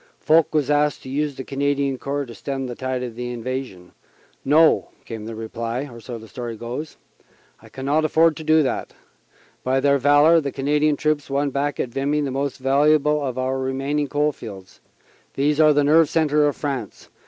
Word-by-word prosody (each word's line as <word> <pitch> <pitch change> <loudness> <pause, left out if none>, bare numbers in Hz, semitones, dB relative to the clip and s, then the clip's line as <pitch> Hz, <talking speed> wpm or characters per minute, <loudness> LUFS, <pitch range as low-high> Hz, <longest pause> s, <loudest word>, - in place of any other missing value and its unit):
Foch 160 0 +3
was 150 -2 +1
asked 150 0 +1
to - - -9
use 145 +1 -2
the 130 - -6
Canadian 140 -1 -1
Corps 140 +1 -3
to 120 - -10
stem 135 +2 -4
the 125 - -5
tide 130 0 -3
of 120 -1 -7
invasion. 120 -6 -5 0.5
"No," 155 +4 +4 0.2
came 110 -2 -7
the 115 0 -6
reply 115 +4 -4
so 120 +1 -7
the 110 0 -12
story 120 -1 -6
goes 125 +7 -6 0.6
"I 110 - -16
cannot 140 +7 -1
afford 160 +1 +3
to 160 - -7
do 155 0 +4
that. 130 - -3 0.7
By 130 +1 +1
their 140 +1 +3
valor 145 +4 +5
the 140 -2 -3
Canadian 150 +2 +1
troops 150 -1 -1
won 140 +1 0
back 145 +2 -2
at 125 - -1
Vimy 140 +4 -1
the 140 -2 -2
most 140 +1 -2
valuable 150 +2 +2
of 130 -2 -3
our 130 +1 -1
remaining 135 +3 -1
coal 150 +1 +1
fields. 100 -8 -11 0.6
These 145 +2 +1
are 155 -1 +6
the 145 0 +3
nerve 155 +2 +4
centre 150 -2 +2
of 145 - -1
France. 135 -8 -5
140 Hz, 185 wpm, -22 LUFS, 130-150 Hz, 0.7 s, are